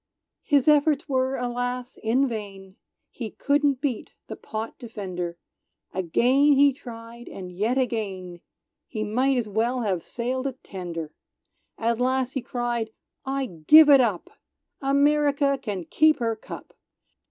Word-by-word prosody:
His 285 -2 +2
efforts 300 0 +4
were 260 -1 0
alas! 245 0 -3
in 250 +5 +2
vain, 195 -4 -7 0.4
He 230 -4 -6
couldn't 285 -1 +1
beat 265 -7 -3
the - - -7
pot 220 +1 -6
defender, 185 -7 -5 0.6
Again 250 - +3
he 280 0 +5
tried, 235 -2 -11
and 180 -2 -8
yet 215 +8 0
again, 195 -8 -3 0.5
He 215 -3 -4
might 255 +5 +1
as 235 -3 -1
well 230 +5 0
have 190 -7 -1
sailed 255 +3 -3
a 270 - -3
tender! 170 -5 -6 0.6
At 230 +1 0
last 260 0 +1
he 265 - -2
cried 240 -2 -2 0.4
"I 270 0 -1
give 260 - +6
it 275 -2 +8
up! 210 -8 -1 0.5
America 280 0 +2
can 200 -8 -4
keep 310 - +4
her 230 -2 -1
cup!" 220 - -10
240 Hz, 135 wpm, -25 LUFS, 210-270 Hz, 0.6 s, it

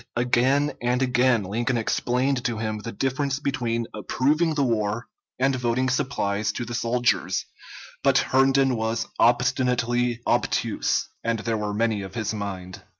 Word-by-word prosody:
Again 130 +4 +2
and 125 +1 +1
again 125 -3 +3
Lincoln 120 +6 -1
explained 125 +3 0
to 120 -2 -1
him 110 -1 -3
the 115 +2 -6
difference 135 +2 -1
between 120 -5 -1
approving 150 +9 +1
the 145 - +2
war 115 -1 0 0.3
and 135 +1 +2
voting 125 +1 0
supplies 110 -6 0
to 120 - -4
the 120 - -6
soldiers, 120 +1 0 0.6
but - - +4
Herndon 135 0 +3
was 110 0 -1
obstinately 125 0 +2
obtuse, - - 0 0.2
and 115 0 0
there 115 +1 -2
were 105 -1 -2
many 110 -1 +1
of 95 -1 -8
his 110 -1 -2
mind. 95 -3 -6
120 Hz, 145 wpm, -24 LUFS, 110-130 Hz, 0.6 s, but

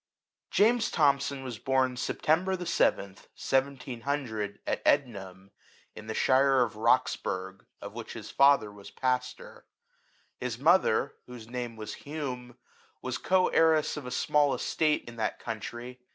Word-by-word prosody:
JAMES 225 +2 +3
THOMSON 140 -2 +1
was 120 -5 -6
bom 130 -1 +1
September 170 +8 0
the 180 -1 -6
7th, 100 - 0
1700, 130 -4 -2
at - - -2
Ednam, 95 -8 -1 0.4
in 110 0 -10
the 110 - -4
shire 135 0 +4
of 110 -3 -4
Roxburgh, 95 -5 0 0.2
of 100 0 -7
which 115 0 -7
his 110 -3 -8
father 140 -6 +4
was 100 -1 -12
pastor. 125 -1 -3 0.7
His 125 -2 -3
mother, 145 -3 +3
whose 120 -3 -10
name 120 -1 -5
was 110 -1 -7
Hume, 130 -5 -6 0.5
was 130 -1 -3
co 185 0 +2
heiress 160 -2 +3
of 145 -4 -7
a - - -4
small 145 +2 +2
estate 155 -1 0
in 120 0 -10
that 110 -1 -2
country. 120 +2 -7
125 Hz, 140 wpm, -29 LUFS, 110-140 Hz, 0.7 s, shire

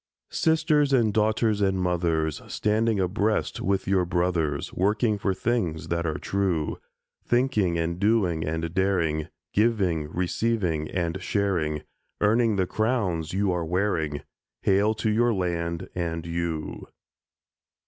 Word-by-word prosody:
Sisters 155 -3 +2
and 115 -5 +3
daughters 110 0 +2
and 95 -1 +2
mothers, 85 -4 0
Standing 110 0 +1
abreast 100 +4 0
with 100 +1 0
your 95 -1 +3
brothers, 85 -5 -1
Working 105 +3 +1
for 95 - 0
things 95 -6 -1
that 85 0 0
are 80 - -1
true; 95 -6 -1 0.4
Thinking 120 -9 +1
and 85 +1 -2
doing 100 -6 +2
and 80 +1 -3
daring, 85 -5 +1 0.3
Giving, 95 -9 +1
receiving, 90 -4 -1
and 85 +1 -2
sharing, 90 -7 0 0.4
Earning 110 +1 +3
the 95 -1 +1
crowns 100 -7 -1
you 100 0 +1
are 90 -1 -1
wearing— 80 -4 -1 0.4
Hail 100 +3 +3
to 110 - 0
your 115 +1 +2
land 85 -2 -2
and 85 -2 -3
you! 85 -2 -3
95 Hz, 125 wpm, -26 LUFS, 85-105 Hz, 0.4 s, and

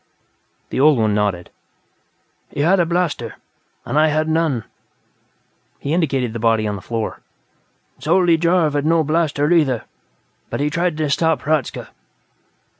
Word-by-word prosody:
The - - -2
old 145 0 +5
one 110 -2 +1
nodded. 100 -4 -1 1.0
"He 145 - -4
had 180 +6 +3
a 170 - +2
blaster, 170 - -1 0.5
and 150 - 0
I 155 - +5
had 155 +1 0
none." 160 -7 0 1.1
He 140 - -3
indicated 135 -9 0
the 115 - -4
body 110 -1 +2
on 105 - -2
the 100 - -8
floor. 115 +1 -4 0.8
"Zoldy 170 +1 +3
Jarv 170 -2 +2
had 145 -1 0
no 160 +1 +3
blaster, 155 -1 0
either, 145 -9 +2 0.7
but - - -4
he 145 +1 0
tried 170 0 -1
to 155 -1 0
stop 160 +1 +1
Hradzka. 150 -4 -1
150 Hz, 145 wpm, -19 LUFS, 120-165 Hz, 1.1 s, old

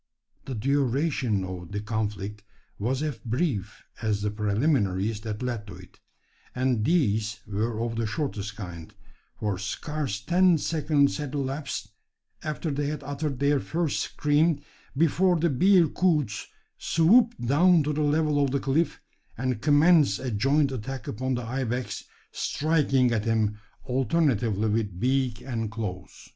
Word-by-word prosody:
The 130 - -4
duration 135 - +1
of 90 0 -7
the 105 - -1
conflict 105 -1 -3 0.4
was 130 +7 -1
as 150 -5 -3
brief 115 - -2 0.2
as 105 -2 0
the 105 - 0
preliminaries 105 -2 0
that 110 +1 -5
led 120 -4 -3
to 100 - -9
it; - - -15 0.6
and 125 -3 +1
these 110 - +1
were 110 +2 -2
of 115 0 -2
the 115 -1 0
shortest 110 -7 -3
kind: 90 -6 -8 0.5
for 105 -3 -1
scarce 125 +2 -3
ten 175 - +4
seconds 150 -2 +1
had 150 -2 -5
elapsed, 135 -6 -3 0.5
after 155 +1 -3
they 145 +1 -1
had 150 -1 -4
uttered 140 0 -3
their 140 +1 +2
first 165 +2 -1
scream, 150 +1 +1 0.4
before 170 +3 +3
the 170 0 +2
bearcoots 165 - +3 0.3
swooped 225 +9 +4
down 155 +7 +4
to 150 +1 -1
the 150 - -1
level 150 -1 +2
of 140 - +1
the 140 +2 0
cliff, 145 +4 0 0.4
and 125 -2 -2
commenced 150 - +5
a 130 -1 -4
joint 135 +6 +2
attack 130 0 -5
upon 130 +4 -2
the 120 - -3
ibex, 125 +1 -3 0.3
striking 140 -5 +1
at 110 -2 0
him 110 -2 +1 0.2
alternately 135 -2 +1
with 105 -2 -1
beak 125 -1 0
and 115 -4 -3
claws. 105 -4 -7
130 Hz, 140 wpm, -26 LUFS, 105-150 Hz, 0.6 s, commenced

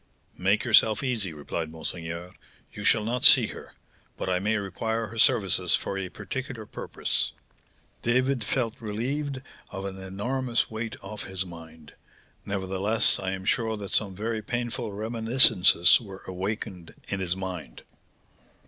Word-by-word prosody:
'Make 100 +4 +2
yourself 110 0 +5
easy,' 115 -9 -1
replied 80 +2 -4
monseigneur; 85 +2 -6 0.4
'you 105 - -7
shall 110 +1 +4
not 120 +3 -2
see - - +9
her, - - -9 0.4
but - - -3
I 90 - +2
may 105 +3 +1
require 110 +3 -2
her 110 +1 -7
services 105 -7 +4
for - - -3
a 95 -1 -3
particular 120 +3 -6
purpose.' - - -2 0.7
David 130 +1 +2
felt 120 +2 -1
relieved 130 +6 -3 0.3
of 95 0 -6
an 95 -1 -5
enormous 120 +7 -1
weight 110 0 -4
off 105 +2 -7
his 95 0 -1
mind. 80 -3 -12 0.5
Nevertheless, 100 +3 0
I 95 0 -2
am 95 0 -6
sure 110 0 +1
that 100 -2 -6
some 100 -3 0
very 110 +2 -2
painful 120 0 -3
reminiscences 110 -4 +5
were 95 -4 -10
awakened 95 -1 -5
in 100 - -1
his 90 -2 0
mind." 90 -10 -6
105 Hz, 140 wpm, -27 LUFS, 95-115 Hz, 0.7 s, see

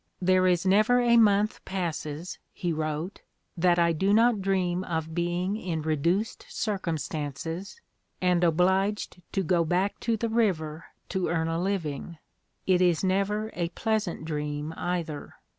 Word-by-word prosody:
"There 185 0 +3
is 180 0 +2
never 215 +6 +4
a 240 -1 +4
month 210 -2 +3
passes," 170 -3 -4
he 175 -2 -2
wrote, 155 +4 -3 0.3
"that 175 0 +3
I 170 -1 +4
do 195 +6 +2
not 230 -2 +4
dream 185 -2 0
of 160 -2 -3
being 175 +3 -1
in 170 -7 -3
reduced 170 +7 0
circumstances, 165 - -3 0.4
and 180 -1 +2
obliged 190 +4 +1
to 195 - +1
go 175 0 +2
back 180 +5 0
to 230 -1 0
the 230 - -1
river 170 -9 0 0.2
to 190 -2 -1
earn 165 -1 0
a 165 +1 -1
living. 170 -4 -3 0.5
It 185 -1 +3
is 175 -2 +3
never 200 +3 0
a 170 -1 -2
pleasant 215 -3 -2
dream, 150 0 -3
either. 170 -4 -4
180 Hz, 140 wpm, -27 LUFS, 165-195 Hz, 0.5 s, never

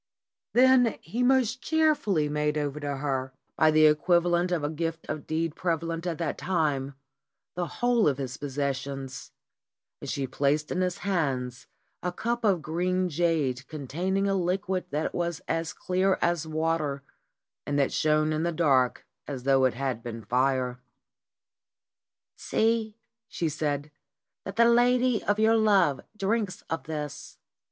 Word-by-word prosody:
Then 250 -2 +5
he 225 +9 -4
most 250 -1 +2
cheerfully 300 - +2
made 150 0 0
over 145 0 -2
to 145 -1 -3
her, 135 -2 -2 0.2
by 155 - +4
the 155 0 +5
equivalent 175 +3 +3
of 170 -4 0
a - - +1
deed 165 +1 -2
of 155 -1 -5
gift 160 0 -1
prevalent 165 0 -2
at 165 -3 -2
that 165 -3 -3
time, 145 -7 -1 0.6
the 175 -1 -2
whole 240 +5 +2
of 140 -3 +1
his 130 -3 -4
possessions, 135 -1 -4 0.7
and - - -6
she 140 - -1
placed 140 +3 0
in 180 - 0
his 180 -1 -1
hands 135 -10 -1 0.3
a 180 - -2
cup 235 +6 -2
of 190 -7 +2
green 180 +3 0
jade 150 -6 0
containing 175 +7 -2
a 195 - +1
liquid 185 0 -1
that 150 +2 -2
was 170 -1 -2
as 165 0 -1
clear 185 +1 0
as 170 -2 0
water, 155 -3 -1 0.6
and 145 - 0
that 140 -1 +1
shone 155 0 +2
in 155 - -1
the 170 +1 0
dark 140 -7 +2 0.2
as 135 -4 -5
though 135 -1 +4
it 125 - +1
had 130 -3 -2
been 115 -1 -7
fire. 125 +1 +1 1.6
"See," 220 -1 0 0.3
she 165 - -2
said, 150 -1 -2 0.5
"that 195 - -6
the 235 +1 +5
lady 245 0 +3
of 205 +1 +1
your 220 +1 +4
love 200 -10 +3 0.2
drinks 205 -1 -1
of 165 - -3
this. 150 -2 -6
160 Hz, 150 wpm, -27 LUFS, 140-185 Hz, 1.6 s, Then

